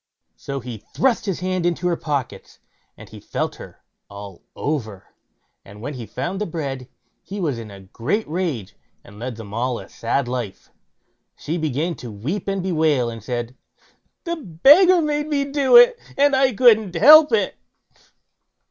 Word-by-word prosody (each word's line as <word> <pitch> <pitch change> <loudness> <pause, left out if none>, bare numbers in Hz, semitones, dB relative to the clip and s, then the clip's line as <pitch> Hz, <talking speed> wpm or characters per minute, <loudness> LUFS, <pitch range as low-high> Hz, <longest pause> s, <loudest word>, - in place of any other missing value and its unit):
So 140 -1 -6
he 120 -3 -8 0.2
thrust 255 -5 +1
his 185 -3 -2
hand 185 -1 -1
into 175 +1 -1
all 180 - +2
her - - +1
pockets, 145 -6 -5 0.4
and - - -12 0.2
felt - - -3
her - - -13 0.3
all 100 -2 -10
over, 110 -10 -4 0.5
and 100 +1 -14
when 145 +7 -6
he 120 -4 -8
found 190 +3 -4
the 210 - -1
bread, 135 -6 -5 0.3
he 200 +2 -8
was 145 -10 -2
in 110 -2 -9
a 100 -1 -12
great 120 - -3
rage, 155 - -3 0.3
and 105 +1 -15
led 125 0 -5
them 105 -2 -10
all 120 +2 -1
a - - -10
sad 120 +3 -2
life. 120 -6 -6 0.6
She 160 - -4
began 155 +1 -2
to 120 - -8
weep 135 - -5
and 195 -2 -2
bewail, 155 -9 +1
and 115 -2 -10
said: 120 +1 -4 0.7
"The 340 -1 -3
beggar 310 - +5
made 295 0 -1
me 285 -2 0
do 280 - +2
it, 485 0 +7 0.2
and 285 0 +4
I 265 0 +3
couldn't 215 -5 +4
help 300 - +8
it." 455 - +1
160 Hz, 165 wpm, -21 LUFS, -, 0.7 s, help